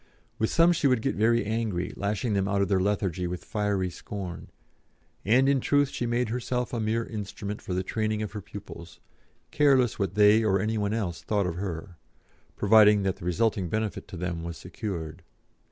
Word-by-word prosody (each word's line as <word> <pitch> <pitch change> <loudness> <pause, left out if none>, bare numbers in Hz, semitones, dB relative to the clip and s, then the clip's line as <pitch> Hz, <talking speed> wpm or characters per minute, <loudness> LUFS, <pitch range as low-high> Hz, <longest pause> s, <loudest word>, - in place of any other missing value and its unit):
With 110 - +1
some 170 +1 +5
she 155 - +1
would 125 -4 +2
get 135 - +1
very 115 +1 +2
angry, 110 -5 -2
lashing 105 +3 -1
them 100 -1 +1
out 100 0 0
of 100 - -2
their 95 -2 +3
lethargy 95 -2 0
with 90 0 -6
fiery 100 -3 -1
scorn; 90 -1 -7 0.8
and 125 +6 +4
in 140 -1 +3
truth 145 +2 +2
she 120 - -3
made 120 0 0
herself 125 +1 -2
a 120 - -1
mere 110 +1 0
instrument 105 -1 -6
for 90 - -4
the 95 - 0
training 110 +2 -1
of 105 - -5
her 105 -1 -6
pupils, 85 -2 -10 0.5
careless 135 -6 +3
what 95 -2 -1
they, 105 +2 +6
or 100 -2 +2
any 110 +2 -1
one 105 +1 0
else 95 -7 -3
thought 105 -2 0
of 85 -1 -3
her, 90 -1 -5 0.6
providing 105 -1 +5
that 95 -2 -1
the - - -10
resulting 95 0 0
benefit 110 +1 -3
to 95 - -8
them 85 -1 -3
was 85 0 -6
secured. 90 -6 -6
105 Hz, 190 wpm, -27 LUFS, 95-115 Hz, 0.8 s, they